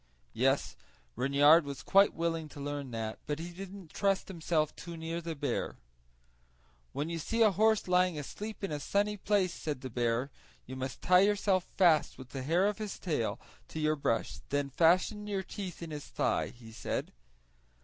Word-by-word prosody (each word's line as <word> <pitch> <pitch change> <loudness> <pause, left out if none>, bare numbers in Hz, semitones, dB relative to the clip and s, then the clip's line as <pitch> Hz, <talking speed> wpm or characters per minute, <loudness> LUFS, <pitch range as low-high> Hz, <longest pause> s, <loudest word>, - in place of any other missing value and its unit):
Yes, - - +1 0.4
Reynard 145 +6 +6
was 140 -1 -6
quite 195 +1 +5
willing 165 -2 -1
to 145 - -11
learn 145 -1 -4
that, 110 -2 -4
but 145 0 -1
he 170 +2 -6
didn't 190 -2 -9
trust 195 -1 +1
himself 160 -4 0
too 170 -1 -8
near 165 +1 -4
the 165 -1 -4
bear. 140 - -2 1.1
"When 145 +4 -2
you 165 0 -3
see 225 +8 +2
a 215 - +6
horse 220 +2 +3
lying 180 -2 +3
asleep 210 +9 -6
in 195 - -2
a 150 - -2
sunny 205 +6 0
place," 195 -3 +1
said 150 -4 -4
the 130 - -6
bear, 120 +3 0 0.3
"you 130 - -7
must 130 -1 -5
tie 180 0 +6
yourself 200 -2 +2
fast 170 -5 +4
with 130 -1 -10
the 135 - -5
hair 165 +8 +2
of 210 0 0
his 210 -2 -4
tail 150 - -1 0.3
to 160 - -6
your 155 0 +2
brush, 115 -6 -1
and - - -16
then 145 0 0
fasten 185 - +3
your 195 -2 -1
teeth 185 -3 -6
in 165 - -7
his 150 -1 -6
thigh," - - 0
he 115 -2 -13
said. 110 - -4
165 Hz, 185 wpm, -31 LUFS, 145-195 Hz, 1.1 s, Reynard